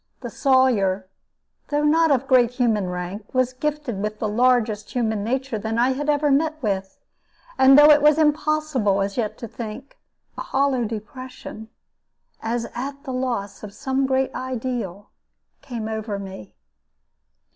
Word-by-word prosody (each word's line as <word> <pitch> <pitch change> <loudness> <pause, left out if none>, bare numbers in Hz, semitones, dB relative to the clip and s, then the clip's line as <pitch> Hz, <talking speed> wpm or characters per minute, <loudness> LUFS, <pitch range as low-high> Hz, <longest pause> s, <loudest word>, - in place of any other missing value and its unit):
The - - -6
Sawyer, 225 -9 +2 0.6
though 295 0 0
not 320 +2 +4
of 275 -2 +2
great 250 -3 +5
human 225 -6 0
rank, 180 +4 -6
was 255 0 +2
gifted 285 -6 -3
with 210 +1 -3
the 215 - -2
largest 225 -1 +1
human 220 -4 0
nature 255 0 -2
that 220 +2 -3
I 245 +2 +3
had 290 +3 -2
ever 295 0 +2
met 310 +3 +1
with. 195 -2 -2 0.6
And 265 +1 +7
though 295 +1 +9
it 295 0 +6
was 300 0 +5
impossible 300 -9 +1
as 195 0 -4
yet 220 -4 -2
to 235 - -7
think, 230 +5 -8 0.4
a - - -3
hollow 270 -3 0
depression, 220 0 -8 0.7
as 230 +1 -2
at 275 +3 -5
the 265 -4 -5
loss 245 -6 -3
of 205 -1 -9
some 270 -1 -1
great 265 0 0
ideal, 240 -6 -4 0.5
came 230 -4 -5
over 220 -2 -3
me. 190 - -9
245 Hz, 150 wpm, -23 LUFS, 215-275 Hz, 0.7 s, though